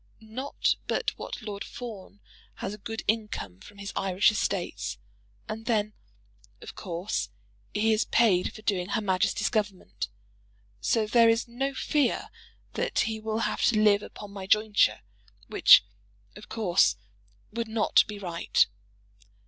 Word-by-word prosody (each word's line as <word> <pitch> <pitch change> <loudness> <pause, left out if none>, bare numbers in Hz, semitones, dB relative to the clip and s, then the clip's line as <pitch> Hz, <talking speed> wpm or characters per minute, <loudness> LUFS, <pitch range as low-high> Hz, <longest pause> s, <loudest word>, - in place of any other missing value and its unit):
Not 230 +5 -1
but - - 0
what - - -7
Lord 205 -2 -5
Fawn 210 -4 -9 0.3
has 200 - -5
a 210 - -9
good 225 +2 -5
income 210 - -2
from 205 - -15
his 200 0 -6
Irish 195 +1 +3
estates; 175 - -2 0.5
and 220 +1 -6
then, 215 -3 +1 0.7
of - - -10
course, 175 - -3 0.4
he 220 +2 +2
is 215 - +1
paid 200 -6 +3
for 215 - -12
doing 185 -4 0
Her 220 - 0
Majesty's 190 -3 +1
Government; 185 - -2 0.7
so 215 - +1
there 230 +1 +5
is 225 +1 +2
no 270 +3 -3
fear 285 -1 0 0.4
that - - 0
he 220 -1 -2
will 220 +1 -2
have - - -1
to 215 - +3
live 210 -1 +5
upon 205 -1 -10
my 195 -1 -7
jointure, 210 - +3 0.4
which, - - +7 0.5
of 210 - -12
course, 195 -6 +3 0.6
would 230 +1 -3
not 220 -1 +4
be 210 0 -6
right. 175 -4 +1
210 Hz, 140 wpm, -28 LUFS, 195-225 Hz, 0.7 s, which